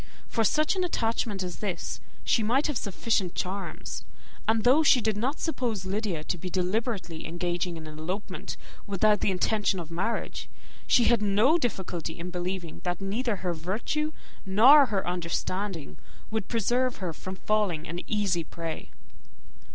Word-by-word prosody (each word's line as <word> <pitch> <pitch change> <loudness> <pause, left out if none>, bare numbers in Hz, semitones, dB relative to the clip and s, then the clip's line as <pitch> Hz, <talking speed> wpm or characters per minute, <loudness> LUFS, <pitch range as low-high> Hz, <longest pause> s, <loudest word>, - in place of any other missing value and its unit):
For 225 - +1
such 305 - +3
an 370 - +1
attachment 225 - 0
as 180 -1 -5
this, 200 -4 -3 0.2
she 230 - +3
might 245 +7 +2
have 295 - 0
sufficient 200 -3 0
charms; 195 +2 -4 0.4
and 220 0 +3
though 260 +6 +6
she 285 -4 +6
did 220 -2 +1
not 255 +8 -1
suppose 235 - -1
Lydia 190 -5 -1
to 180 +2 -3
be 185 - -4
deliberately 185 -2 -1
engaging 175 +1 -2
in 160 - -8
an 155 0 -9
elopement, 185 +6 -4 0.3
without 205 +1 +3
the - - +2
intention 195 +1 +1
of 170 -1 -7
marriage, 195 +8 -2 0.4
she 245 - +5
had 235 -1 +4
no 215 +11 +4
difficulty 185 - -3
in 175 +2 -5
believing 180 -1 -4
that 175 -1 -1
neither 210 +4 -1
her 180 -2 -2
virtue 210 - -2 0.3
nor 255 +9 +8
her 200 -5 -1
understanding 180 0 -2 0.3
would 220 -3 -1
preserve 245 +3 +1
her 180 -4 -3
from 185 +4 -7
falling 195 -6 0
an 175 +2 -4
easy 200 -5 +1
prey. 165 0 -6
195 Hz, 155 wpm, -28 LUFS, 175-230 Hz, 0.4 s, nor